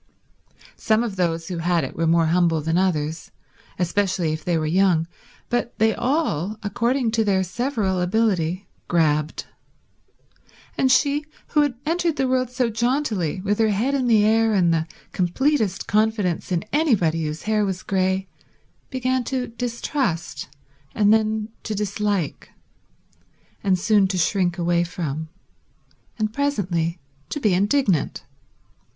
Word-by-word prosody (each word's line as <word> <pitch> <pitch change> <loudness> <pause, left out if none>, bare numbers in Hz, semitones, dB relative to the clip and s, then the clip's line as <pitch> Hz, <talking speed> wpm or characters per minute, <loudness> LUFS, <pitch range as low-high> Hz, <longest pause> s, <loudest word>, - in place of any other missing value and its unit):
Some 220 +1 +2
of 220 -5 -4
those 165 -3 -1
who 175 -2 -4
had 175 0 +1
it - - -5
were 165 0 0
more 165 0 +4
humble 165 0 +2
than 160 +2 -1
others, 160 -4 0 0.5
especially 180 -2 0
if 155 0 -5
they 175 -2 +1
were 155 - -1
young, 170 0 +3 0.4
but 240 -1 -2
they 220 0 +3
all, 220 - -1
according 235 +3 0
to 225 0 +2
their 195 -3 +2
several 205 -3 -1
ability, 185 -2 0 0.2
grabbed; 155 -3 +1 1.3
and 260 -1 +2
she 285 +2 +3 0.2
who 300 - +3
had 290 -4 +1
entered 335 0 0
the 265 -3 0
world 255 -1 +1
so 250 0 0
jauntily, 225 - -1
with 205 +2 -1
her 220 -1 +4
head 220 +7 0
in 260 -3 +1
the 215 -3 +5
air 225 0 +3
and 175 -3 +3
the 160 0 0 0.2
completest 205 - 0
confidence 210 -5 0
in 175 -2 0
anybody 195 - +2
whose 150 +1 -5
hair 215 -1 +1
was 190 -2 -3
grey, 190 0 0 0.6
began 255 -1 0
to 255 0 -2
distrust, 235 - -3 0.5
and 210 0 +4
then 215 0 +1
to 215 - -4
dislike, 205 -4 -2 1.1
and 190 -2 +3
soon 205 +1 +3
to 185 -1 -2
shrink 180 0 +1
away 175 0 +2
from, 160 -3 -4 0.9
and 215 -1 -1
presently 185 - -1 0.3
to 295 - -3
be 215 -8 +2
indignant. 200 - +1
200 Hz, 140 wpm, -23 LUFS, 175-235 Hz, 1.3 s, the